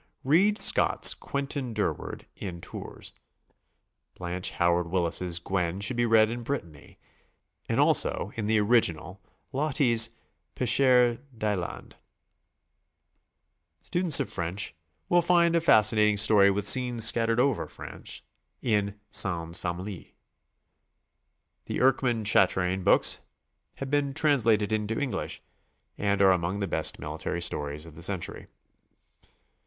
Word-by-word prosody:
Read 190 Hz, +10 st, +2 dB
Scott's -, -, +4 dB
"Quentin 140 Hz, -4 st, -5 dB
Durward" 105 Hz, -, -4 dB
in 90 Hz, -4 st, -7 dB
Tours. -, -, -10 dB, 1.0 s
Blanche 90 Hz, 0 st, -4 dB
Howard 85 Hz, 0 st, +1 dB
Willis' 85 Hz, 0 st, -1 dB
"Guenn" 90 Hz, -1 st, -3 dB
should 105 Hz, +5 st, -2 dB
be 120 Hz, 0 st, 0 dB
read 110 Hz, -1 st, +4 dB
in 120 Hz, +1 st, -5 dB
Brittany, 100 Hz, -, -7 dB, 0.7 s
and -, -, 0 dB
also, 95 Hz, -, +2 dB
in 110 Hz, -2 st, -4 dB
the 110 Hz, 0 st, +2 dB
original. 100 Hz, -4 st, 0 dB, 0.3 s
Loti's 130 Hz, -5 st, +2 dB, 0.5 s
"Pecheur 125 Hz, -1 st, +3 dB, 0.2 s
d'Islande." 105 Hz, -5 st, -4 dB, 1.9 s
Students 175 Hz, -4 st, +4 dB
of -, -, -2 dB
French 90 Hz, +1 st, -4 dB, 0.3 s
will 175 Hz, -, +3 dB
find 170 Hz, -1 st, +2 dB
a 170 Hz, -, +2 dB
fas 110 Hz, -10 st, +5 dB
cinating 105 Hz, -1 st, +2 dB
story 100 Hz, -1 st, +5 dB
with 100 Hz, +1 st, -1 dB
scenes 125 Hz, -2 st, +4 dB
scattered 115 Hz, 0 st, +1 dB
over 135 Hz, -2 st, 0 dB
France, -, -, -9 dB, 0.4 s
in 105 Hz, -3 st, -1 dB
"Sans 85 Hz, -2 st, 0 dB
Famille." 90 Hz, +2 st, -6 dB, 1.5 s
The -, -, -4 dB
Erckmann 125 Hz, -4 st, +1 dB
Chatrain 95 Hz, -2 st, +2 dB
books -, -, +3 dB, 0.6 s
have 135 Hz, 0 st, -7 dB
been 140 Hz, -1 st, -1 dB
trans 145 Hz, -6 st, +1 dB
lated 105 Hz, -2 st, +2 dB
into 110 Hz, +1 st, -2 dB
English, 145 Hz, -3 st, -4 dB, 0.5 s
and 100 Hz, -1 st, 0 dB
are 95 Hz, -, +6 dB
among 90 Hz, +1 st, -1 dB
the 100 Hz, -1 st, -3 dB
best -, -, 0 dB
military -, -, -5 dB
stories 75 Hz, -3 st, -3 dB
of 80 Hz, -, -13 dB
the 80 Hz, -, -13 dB
century. 95 Hz, 0 st, -3 dB
105 Hz, 120 wpm, -26 LUFS, 90-125 Hz, 1.9 s, are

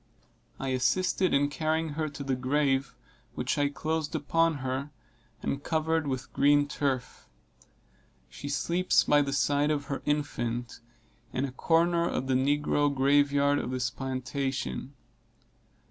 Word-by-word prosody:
I 135 Hz, -, -3 dB
assisted 180 Hz, +8 st, +1 dB
in 145 Hz, +1 st, +3 dB
carrying 160 Hz, +2 st, -1 dB
her 155 Hz, +1 st, -2 dB
to 145 Hz, 0 st, -7 dB
the 135 Hz, -1 st, 0 dB
grave, 135 Hz, 0 st, 0 dB, 0.4 s
which -, -, -1 dB
I 145 Hz, 0 st, +2 dB
closed 155 Hz, +1 st, -2 dB
upon 165 Hz, +2 st, +2 dB
her, 130 Hz, +3 st, -2 dB, 0.5 s
and 140 Hz, +1 st, -2 dB
covered 160 Hz, -1 st, 0 dB
with 130 Hz, -2 st, -4 dB
green 145 Hz, +1 st, +4 dB
turf. 135 Hz, -4 st, -3 dB, 1.0 s
She 145 Hz, -, -8 dB
sleeps 170 Hz, +5 st, +2 dB
by 145 Hz, 0 st, +4 dB
the 140 Hz, -1 st, -1 dB
side 145 Hz, +1 st, +2 dB
of 145 Hz, -2 st, -1 dB
her -, -, -4 dB
infant, 120 Hz, -5 st, -2 dB, 0.5 s
in 130 Hz, -, 0 dB
a 135 Hz, -, -5 dB
corner 170 Hz, +4 st, +2 dB
of 130 Hz, -, -2 dB
the 130 Hz, -, 0 dB
negro 145 Hz, +2 st, +2 dB
grave 140 Hz, +1 st, +3 dB
yard 140 Hz, 0 st, +3 dB
of -, -, -4 dB
this 125 Hz, -2 st, -1 dB
plantation. 135 Hz, +1 st, -3 dB
145 Hz, 140 wpm, -28 LUFS, 135-150 Hz, 1.0 s, green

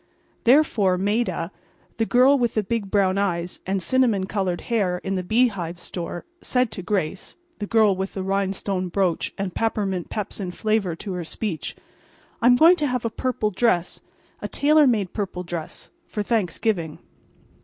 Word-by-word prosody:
Therefore 230 Hz, -8 st, +4 dB
Maida—the 205 Hz, +1 st, -3 dB
girl 255 Hz, +3 st, +5 dB
with 240 Hz, -4 st, 0 dB
the 215 Hz, -, +2 dB
big 205 Hz, -1 st, -2 dB
brown 195 Hz, -1 st, +2 dB
eyes 175 Hz, -3 st, -1 dB
and 190 Hz, -1 st, -1 dB
cinnamon 240 Hz, -7 st, +2 dB
colored 190 Hz, -3 st, -2 dB
hair 200 Hz, -7 st, 0 dB
in 195 Hz, -, -2 dB
the 185 Hz, -, 0 dB
Bee 240 Hz, +7 st, +3 dB
Hive 175 Hz, -4 st, -5 dB
Store—said 245 Hz, -, -3 dB
to 185 Hz, -, -6 dB
Grace—the 205 Hz, -, -4 dB
girl 215 Hz, -3 st, +4 dB
with 190 Hz, +1 st, -4 dB
the 190 Hz, -, -3 dB
rhinestone 195 Hz, -1 st, -1 dB
brooch 180 Hz, -2 st, 0 dB
and 195 Hz, -2 st, -3 dB
peppermint 200 Hz, -5 st, -1 dB
pepsin 205 Hz, -2 st, -4 dB
flavor 205 Hz, -2 st, 0 dB
to 190 Hz, +3 st, -6 dB
her 180 Hz, -1 st, -3 dB
speech—"I'm 220 Hz, +6 st, -2 dB
going 335 Hz, +7 st, +7 dB
to 300 Hz, -3 st, 0 dB
have 250 Hz, -2 st, -2 dB
a 230 Hz, -, -1 dB
purple 235 Hz, -4 st, -1 dB
dress—a 185 Hz, -4 st, -2 dB
tailor 300 Hz, 0 st, +4 dB
made 210 Hz, -7 st, +1 dB
purple 190 Hz, -4 st, -3 dB
dress—for 180 Hz, -, -6 dB
Thanksgiving." 195 Hz, -5 st, -1 dB
200 Hz, 145 wpm, -23 LUFS, 185-235 Hz, -, going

